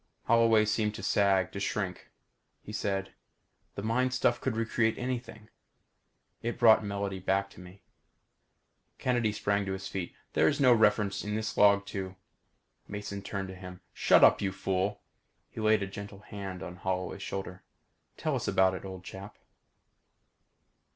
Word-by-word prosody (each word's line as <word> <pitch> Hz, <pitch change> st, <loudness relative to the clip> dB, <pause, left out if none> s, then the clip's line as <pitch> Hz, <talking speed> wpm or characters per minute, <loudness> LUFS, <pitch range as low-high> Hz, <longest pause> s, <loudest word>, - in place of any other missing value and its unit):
Holloway 115 Hz, -2 st, +4 dB
seemed 105 Hz, 0 st, 0 dB
to -, -, -7 dB
sag 95 Hz, -2 st, +2 dB
to 100 Hz, -, -5 dB
shrink. 100 Hz, -2 st, -3 dB, 0.5 s
He 105 Hz, -, -9 dB
said, 100 Hz, -2 st, -2 dB, 0.6 s
"The 100 Hz, -, -5 dB
mind 125 Hz, +3 st, +1 dB
stuff 120 Hz, 0 st, +1 dB
could 130 Hz, -4 st, -1 dB
recreate 115 Hz, 0 st, +1 dB
anything. 120 Hz, -3 st, -5 dB, 0.9 s
It 120 Hz, +1 st, -3 dB
brought 110 Hz, -2 st, +6 dB
Melody 100 Hz, -1 st, -3 dB
back 95 Hz, +2 st, 0 dB
to -, -, -15 dB
me." 90 Hz, +2 st, -13 dB, 1.1 s
Kennedy 120 Hz, -4 st, +1 dB
sprang 100 Hz, -1 st, 0 dB
to 95 Hz, -, -1 dB
his 95 Hz, 0 st, -5 dB
feet. 90 Hz, -3 st, -5 dB, 0.2 s
"There -, -, +4 dB
is 145 Hz, -, +1 dB
no 130 Hz, -3 st, +6 dB
reference 105 Hz, -3 st, +2 dB
in 105 Hz, 0 st, -3 dB
this 110 Hz, -1 st, -3 dB
log 100 Hz, -1 st, +5 dB
to 95 Hz, -2 st, -5 dB, 0.4 s
" -, -, -45 dB, 0.3 s
Mason 100 Hz, -1 st, -5 dB
turned 95 Hz, -1 st, -4 dB
on 95 Hz, -, -10 dB
him. 90 Hz, -1 st, -10 dB
"Shut -, -, +5 dB
up, -, -, +6 dB
you 100 Hz, -2 st, 0 dB
fool!" 95 Hz, +1 st, -2 dB, 0.5 s
He 110 Hz, -, -6 dB
laid 110 Hz, -1 st, +3 dB
a -, -, -1 dB
gentle 100 Hz, +1 st, -9 dB
hand 95 Hz, -3 st, -7 dB
on 90 Hz, -, -8 dB
Holloway's 95 Hz, +1 st, -3 dB
shoulder. 95 Hz, -2 st, -5 dB, 0.6 s
"Tell -, -, -1 dB
us -, -, -3 dB
about 95 Hz, 0 st, +3 dB
it, 95 Hz, -, -6 dB
old 95 Hz, -2 st, -8 dB
chap." 100 Hz, +2 st, -9 dB
100 Hz, 160 wpm, -30 LUFS, 95-110 Hz, 1.1 s, brought